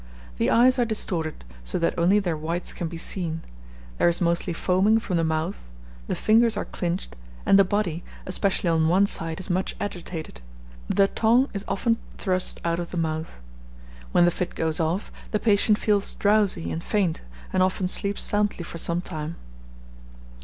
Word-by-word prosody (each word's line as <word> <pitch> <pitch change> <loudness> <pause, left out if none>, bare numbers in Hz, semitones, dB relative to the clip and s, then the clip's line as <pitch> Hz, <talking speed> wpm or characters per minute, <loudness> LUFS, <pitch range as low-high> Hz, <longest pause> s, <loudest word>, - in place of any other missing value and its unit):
The - - +2
eyes 255 +2 +5
are - - +5
distorted, 175 - -2 0.2
so - - -3
that 170 - +1
only 175 +4 +4
their 180 -5 0
whites 165 +3 -3
can 175 - -3
be 165 +1 -7
seen; 165 -2 -1 0.6
there - - +5
is 170 - 0
mostly 170 0 0
foaming 190 +6 +3
from 215 -5 -2
the 165 - +1
mouth; 160 - -2 0.4
the - - -1
fingers 225 0 +3
are - - -2
clinched; 175 - -3 0.3
and 195 - +6
the - - +8
body, 185 -4 -1 0.2
especially 185 -1 0
on 160 -1 +3
one 185 +4 +4
side, 165 -4 -4
is 190 - -6
much 185 +1 -1
agitated; 170 - -6 0.5
the 195 - +4
tongue 235 +6 +3
is 200 -1 -3
often 230 +3 +1 0.2
thrust 185 -2 -1
out 170 0 0
of 175 - -4
the 180 - -5
mouth. 160 -1 -2 0.8
When 175 - +5
the 175 - +4
fit 180 - -4
goes 160 -1 -1
off, 165 +5 -1 0.2
the 210 - 0
patient 210 -1 +3
feels 205 -2 +1
drowsy 205 -4 +2
and 165 - -4
faint, 190 -6 0 0.3
and 185 - +2
often 185 0 +1
sleeps 200 +2 -1
soundly 205 -3 0
for 170 0 -7
some 170 +1 0
time. 160 -2 -5
180 Hz, 175 wpm, -25 LUFS, 165-205 Hz, 0.8 s, the